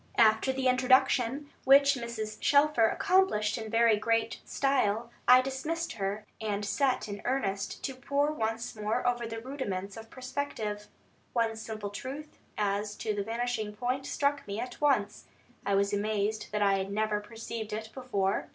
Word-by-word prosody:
After 220 Hz, +3 st, +5 dB
the 260 Hz, 0 st, 0 dB
introduction, 255 Hz, +1 st, +3 dB
which 280 Hz, +1 st, +7 dB
Mrs. 235 Hz, -4 st, -5 dB
Shelfer 285 Hz, -6 st, +4 dB
accomplished 360 Hz, -, +2 dB
in 220 Hz, -2 st, -5 dB
very 230 Hz, -1 st, +4 dB
great 225 Hz, +1 st, 0 dB
style, 235 Hz, -4 st, 0 dB, 0.2 s
I 250 Hz, +1 st, +9 dB
dismissed 270 Hz, +6 st, -3 dB
her, 205 Hz, 0 st, -3 dB, 0.2 s
and 205 Hz, -1 st, -2 dB
set 260 Hz, +5 st, +1 dB
to 215 Hz, -, -6 dB
in 205 Hz, -, -6 dB
earnest 205 Hz, -6 st, -2 dB
to 270 Hz, -, -2 dB
pore 280 Hz, +3 st, 0 dB
once 225 Hz, -4 st, -3 dB
more 215 Hz, 0 st, -1 dB
over 240 Hz, -1 st, 0 dB
the 225 Hz, 0 st, -5 dB
rudiments 205 Hz, -7 st, -4 dB
of 225 Hz, 0 st, -10 dB
perspective. 250 Hz, -6 st, -4 dB, 0.5 s
One 230 Hz, -2 st, +1 dB
simple 215 Hz, -2 st, -6 dB
truth 280 Hz, +8 st, -7 dB, 0.2 s
as 205 Hz, 0 st, -1 dB
to 215 Hz, 0 st, -2 dB
the 205 Hz, -, -2 dB
vanishing 225 Hz, -1 st, -2 dB
point 255 Hz, +4 st, -2 dB
struck 280 Hz, -2 st, 0 dB
me 200 Hz, +2 st, -4 dB
at 250 Hz, +3 st, -6 dB
once. 210 Hz, -9 st, +1 dB, 0.4 s
I 200 Hz, -, +3 dB
was 200 Hz, +1 st, +2 dB
amazed 210 Hz, +1 st, -1 dB
that 210 Hz, 0 st, +1 dB
I 195 Hz, -1 st, +3 dB
had 190 Hz, +1 st, -3 dB
never 215 Hz, 0 st, 0 dB
perceived 225 Hz, 0 st, -7 dB
it 220 Hz, +1 st, -5 dB
before. 205 Hz, -7 st, -1 dB
225 Hz, 160 wpm, -30 LUFS, 210-260 Hz, 0.5 s, I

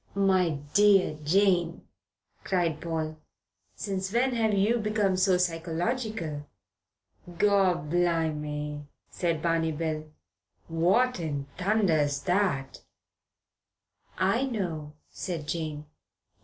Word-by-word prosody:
"My 185 Hz, -5 st, +2 dB, 0.2 s
dear 200 Hz, -5 st, +5 dB
Jane," 175 Hz, 0 st, +2 dB, 0.6 s
cried 175 Hz, -4 st, 0 dB
Paul. 160 Hz, -2 st, -3 dB, 0.6 s
"Since 190 Hz, -2 st, -3 dB
when 250 Hz, +3 st, +2 dB
have 225 Hz, -2 st, +1 dB
you 210 Hz, +4 st, +2 dB
become 210 Hz, -3 st, +1 dB
so 185 Hz, 0 st, +3 dB
psychological?" 170 Hz, -, -2 dB, 0.8 s
"Gorblime," 160 Hz, -5 st, 0 dB, 0.2 s
said 165 Hz, -3 st, -1 dB
Barney 165 Hz, -1 st, +1 dB
Bill, 155 Hz, 0 st, -3 dB, 0.6 s
"what 185 Hz, +9 st, +2 dB
in 145 Hz, -4 st, -3 dB
thunder's 175 Hz, -8 st, +2 dB
that?" 180 Hz, -8 st, 0 dB, 1.4 s
"I 195 Hz, +8 st, +2 dB
know," 170 Hz, -, -4 dB, 0.2 s
said 165 Hz, -6 st, -5 dB
Jane. 155 Hz, -2 st, -3 dB
175 Hz, 90 wpm, -28 LUFS, 155-200 Hz, 1.4 s, dear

